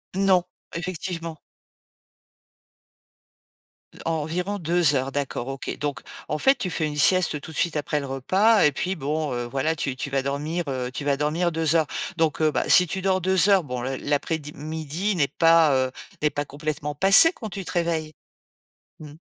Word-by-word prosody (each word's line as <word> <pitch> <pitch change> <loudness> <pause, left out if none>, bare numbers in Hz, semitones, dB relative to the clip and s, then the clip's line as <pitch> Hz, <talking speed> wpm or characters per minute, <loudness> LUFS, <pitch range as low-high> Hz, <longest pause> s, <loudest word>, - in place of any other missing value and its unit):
Non, 190 -2 +3 0.3
effectivement. 170 -2 -5 2.7
En 165 - 0
environ 180 +6 -3
2 165 -2 +3
heures, 135 +1 -1
d'accord, 135 -3 -3
OK. 135 0 -5
Donc 145 -1 -3 0.3
en 150 - -2
fait, 270 - +4
tu 185 - -4
fais 160 -2 -1
une 150 -1 -4
sieste 155 -1 +3
tout 160 - -9
de 145 - -6
suite 170 -2 0
après 150 0 -1
le 140 - -6
repas 190 - +2
et 150 - +4
puis 185 +7 -3
bon, 150 -1 -2
heu, 120 0 -3
voilà, 135 +6 -1
tu 135 -4 -3
tu 140 +1 -5
vas 135 -1 +1
dormir 150 +5 -3
heu, 130 -2 -3
tu 140 +3 -6
vas 140 -1 +1
dormir 165 +4 0
2 160 0 +1
heures. 160 -2 +2 0.3
Donc 160 -2 0
heu, 155 -1 +3
bah, - - -2
si 180 - +7
tu 190 +3 -4
dors 190 0 +1
2 190 +2 +3
heures, 195 -3 +4
bon 125 -3 -5
l 135 0 -3
l'après-di 150 +1 -2
midi 160 +6 -3
n'est 145 -4 +2
pas 165 0 +4
heu, - - -10 0.3
n'est 150 - +3
pas 145 0 -4
complètement 150 +1 -4
passé 195 - +7
quand 220 -3 -8
tu 190 -1 -7
te - - -6
réveilles? 165 -3 -2 0.9
Mmh. 150 -2 -10
155 Hz, 185 wpm, -24 LUFS, 145-175 Hz, 2.7 s, si